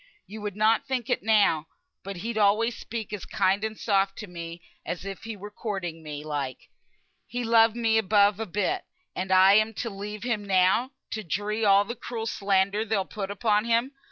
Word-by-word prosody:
You 215 Hz, +2 st, -9 dB
would 205 Hz, -2 st, -4 dB
not 215 Hz, +3 st, +2 dB
think 255 Hz, -3 st, -2 dB
it, -, -, +1 dB
now, 205 Hz, -8 st, +3 dB, 0.4 s
but 195 Hz, +1 st, -6 dB
he'd 235 Hz, 0 st, -2 dB
alway 215 Hz, +2 st, +3 dB
speak 225 Hz, -2 st, -6 dB
as 205 Hz, -, -5 dB
kind 195 Hz, +2 st, +1 dB
and 220 Hz, 0 st, -3 dB
soft 195 Hz, -2 st, +1 dB
to 215 Hz, -, -6 dB
me 170 Hz, -1 st, -8 dB, 0.2 s
as 175 Hz, +2 st, -5 dB
if 195 Hz, +2 st, -7 dB
he 225 Hz, -1 st, -5 dB
were 205 Hz, +2 st, -9 dB
courting 190 Hz, -7 st, -4 dB
me, 150 Hz, -1 st, -7 dB
like. 145 Hz, -4 st, -4 dB, 0.6 s
He 245 Hz, +3 st, -3 dB
loved 225 Hz, -1 st, +5 dB
me 225 Hz, -2 st, +2 dB
above 205 Hz, -1 st, +3 dB
a 225 Hz, -, -3 dB
bit; 210 Hz, -, -1 dB, 0.3 s
and 190 Hz, +1 st, -3 dB
am 195 Hz, +3 st, +6 dB
I -, -, -11 dB
to 230 Hz, -, -3 dB
leave 205 Hz, +1 st, -6 dB
him 235 Hz, -4 st, -1 dB
now 190 Hz, +5 st, +3 dB, 0.2 s
to 220 Hz, -, -3 dB
dree 205 Hz, +5 st, -2 dB
all 200 Hz, 0 st, +5 dB
the 235 Hz, -, -4 dB
cruel 230 Hz, -1 st, -5 dB
slander 200 Hz, 0 st, +1 dB
they'll 210 Hz, -3 st, 0 dB
put 195 Hz, -1 st, -5 dB
upon 210 Hz, +1 st, +1 dB
him? 235 Hz, +3 st, +1 dB
210 Hz, 195 wpm, -26 LUFS, 195-225 Hz, 0.6 s, am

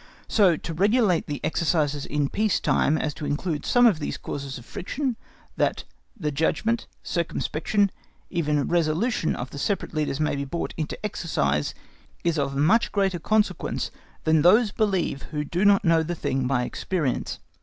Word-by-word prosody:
So 190 Hz, -7 st, +4 dB
to 165 Hz, -, -6 dB
regulate 200 Hz, 0 st, +2 dB
the 145 Hz, -1 st, -3 dB
exercises 150 Hz, -3 st, 0 dB
in 145 Hz, -1 st, 0 dB
peace 210 Hz, +6 st, +1 dB
time 155 Hz, -, +2 dB
as 150 Hz, -2 st, -1 dB
to 150 Hz, -, -6 dB
include 150 Hz, +1 st, -2 dB
some 245 Hz, 0 st, +5 dB
of 205 Hz, -9 st, +5 dB
these 150 Hz, -, -3 dB
causes 140 Hz, -1 st, -5 dB
of 120 Hz, -, -12 dB
friction, 245 Hz, -, -3 dB, 0.4 s
that -, -, +1 dB, 0.4 s
the 150 Hz, -5 st, -1 dB
judgment, 215 Hz, +10 st, 0 dB, 0.2 s
circumspection, 180 Hz, +3 st, 0 dB, 0.4 s
even 150 Hz, -5 st, 0 dB
resolution 170 Hz, +4 st, +1 dB
of 125 Hz, +2 st, -6 dB
the 140 Hz, -, -7 dB
separate 195 Hz, +2 st, -1 dB
leaders 150 Hz, -2 st, -1 dB
may 150 Hz, -1 st, +1 dB
be 140 Hz, -, -2 dB
brought 165 Hz, +5 st, -4 dB
into 155 Hz, -2 st, -3 dB
exercise, 75 Hz, -, -1 dB, 0.5 s
is 170 Hz, -2 st, +1 dB
of 140 Hz, -1 st, -1 dB
much 210 Hz, +11 st, +3 dB
greater 195 Hz, -3 st, +1 dB
consequence 215 Hz, +5 st, 0 dB, 0.3 s
than 160 Hz, -1 st, +4 dB
those 210 Hz, +6 st, +5 dB
believe 190 Hz, -10 st, 0 dB
who 150 Hz, -1 st, -2 dB
do 175 Hz, +6 st, -1 dB
not 200 Hz, 0 st, +5 dB
know 165 Hz, -1 st, +5 dB
the 170 Hz, +2 st, -3 dB
thing 130 Hz, -4 st, -1 dB
by 125 Hz, -2 st, +1 dB
experience. 150 Hz, 0 st, -2 dB
165 Hz, 165 wpm, -25 LUFS, 145-200 Hz, 0.5 s, some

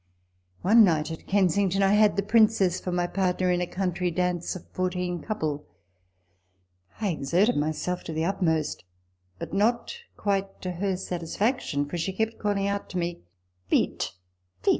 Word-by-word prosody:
i 180 Hz, -, -1 dB
One 225 Hz, +1 st, +8 dB
night, 160 Hz, -4 st, +2 dB
at 160 Hz, -, -8 dB
Kensington, 195 Hz, 0 st, +2 dB
I 195 Hz, +1 st, +4 dB
had 210 Hz, 0 st, +5 dB
the 200 Hz, -, 0 dB
Princess 210 Hz, -4 st, +3 dB
for 180 Hz, -, -4 dB
my 175 Hz, 0 st, +1 dB
partner 180 Hz, 0 st, 0 dB
in 180 Hz, 0 st, +1 dB
a 180 Hz, -, -1 dB
country 180 Hz, -1 st, -1 dB
dance 180 Hz, 0 st, -1 dB
of 185 Hz, -, -9 dB
fourteen 180 Hz, -1 st, -2 dB
couple. 155 Hz, -9 st, -3 dB, 1.3 s
I 210 Hz, -2 st, 0 dB
exerted 175 Hz, -, +2 dB
myself 155 Hz, +4 st, -1 dB
to -, -, -5 dB
the 160 Hz, +1 st, -1 dB
utmost; 160 Hz, -, 0 dB, 0.5 s
but -, -, -7 dB
not 235 Hz, -, +1 dB, 0.2 s
quite 195 Hz, -1 st, -1 dB
to 185 Hz, -, -2 dB
her 185 Hz, +1 st, -1 dB
satisfaction, 175 Hz, -, -1 dB
for 175 Hz, +4 st, -4 dB
she 190 Hz, +4 st, -2 dB
kept 220 Hz, +3 st, -2 dB
calling 205 Hz, -2 st, 0 dB
out 200 Hz, 0 st, -2 dB
to 185 Hz, -, -4 dB
me, 175 Hz, 0 st, -2 dB, 0.3 s
" 90 Hz, 0 st, -43 dB
Vite, -, -, +1 dB, 0.5 s
vite -, -, +3 dB
185 Hz, 165 wpm, -27 LUFS, 170-200 Hz, 1.3 s, One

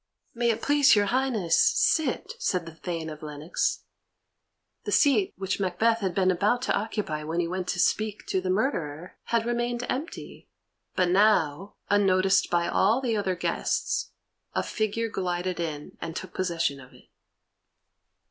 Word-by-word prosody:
"May 235 Hz, 0 st, +1 dB
it 225 Hz, -, -1 dB
please 285 Hz, -3 st, +5 dB
your 205 Hz, -1 st, +3 dB
highness 250 Hz, -10 st, +2 dB
sit," 315 Hz, +7 st, +2 dB
said 180 Hz, -, 0 dB
the 165 Hz, -, -9 dB
Thane 165 Hz, -1 st, -5 dB
of 155 Hz, -1 st, -8 dB
Lennox. 150 Hz, +2 st, -2 dB, 1.0 s
The -, -, -4 dB
seat 240 Hz, -10 st, +4 dB
which 190 Hz, +1 st, -2 dB
Macbeth 210 Hz, +5 st, +1 dB
had 190 Hz, -5 st, -2 dB
been 185 Hz, -1 st, +3 dB
about 210 Hz, +7 st, +1 dB
to -, -, +1 dB
occupy 205 Hz, -8 st, -2 dB
when 160 Hz, +3 st, -2 dB
he 170 Hz, -, 0 dB
went 185 Hz, +1 st, -3 dB
to 175 Hz, -, -2 dB
speak 215 Hz, +2 st, 0 dB
to 190 Hz, -, -1 dB
the 185 Hz, -, -3 dB
murderer 180 Hz, -, -2 dB
had 230 Hz, -1 st, 0 dB
remained 240 Hz, 0 st, -1 dB
empty, 290 Hz, +6 st, -6 dB, 0.5 s
but 180 Hz, -1 st, +2 dB
now, 190 Hz, -3 st, +2 dB, 0.2 s
unnoticed 195 Hz, -1 st, +3 dB
by 170 Hz, 0 st, +1 dB
all 220 Hz, +6 st, +3 dB
the 245 Hz, -4 st, -1 dB
other 195 Hz, -3 st, 0 dB
guests, 175 Hz, -, -1 dB, 0.5 s
a -, -, +1 dB
figure 220 Hz, +1 st, -1 dB
glided 180 Hz, -3 st, -2 dB
in 155 Hz, -3 st, -5 dB
and 165 Hz, -1 st, -5 dB
took 185 Hz, -, -6 dB
possession 170 Hz, -6 st, -1 dB
of 130 Hz, -1 st, -15 dB
it. -, -, -20 dB
190 Hz, 155 wpm, -27 LUFS, 170-225 Hz, 1.0 s, please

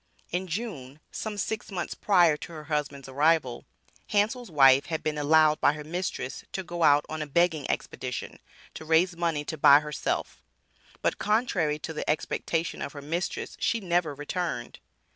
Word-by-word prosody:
In 180 Hz, +2 st, -2 dB
June, 160 Hz, -, -5 dB
some 215 Hz, -2 st, -5 dB
six 215 Hz, +2 st, -3 dB
months 180 Hz, -3 st, -3 dB
prior 175 Hz, -6 st, +4 dB
to 170 Hz, +3 st, -9 dB
her 155 Hz, -1 st, -8 dB
husband's 150 Hz, -3 st, -3 dB
arrival, 145 Hz, -1 st, +1 dB, 0.4 s
Hansel's 215 Hz, +3 st, 0 dB
wife 135 Hz, -3 st, +5 dB
had 160 Hz, -2 st, -3 dB
been 155 Hz, -1 st, -1 dB
allowed 155 Hz, +1 st, +4 dB
by -, -, +4 dB
her 150 Hz, 0 st, -7 dB
mistress 160 Hz, -5 st, -4 dB
to 190 Hz, -, -3 dB
go 175 Hz, -1 st, -6 dB
out 145 Hz, -2 st, +5 dB
on 155 Hz, 0 st, -5 dB
a 150 Hz, -, -3 dB
begging 160 Hz, -1 st, +1 dB
expedition, 125 Hz, -1 st, -4 dB, 0.3 s
to -, -, -8 dB
raise 165 Hz, +3 st, +3 dB
money 165 Hz, -3 st, -1 dB
to 160 Hz, -, -5 dB
buy 140 Hz, 0 st, +8 dB
herself; 150 Hz, -1 st, -3 dB, 0.6 s
but -, -, 0 dB
contrary 200 Hz, -9 st, +1 dB
to 160 Hz, +1 st, -6 dB
the 155 Hz, -, -4 dB
expectation 160 Hz, +2 st, -1 dB
of -, -, -5 dB
her 145 Hz, -, -8 dB
mistress 170 Hz, +5 st, -3 dB
she 230 Hz, -, +1 dB
never 175 Hz, -6 st, 0 dB
returned. 145 Hz, -4 st, -4 dB
160 Hz, 165 wpm, -27 LUFS, 150-175 Hz, 0.6 s, buy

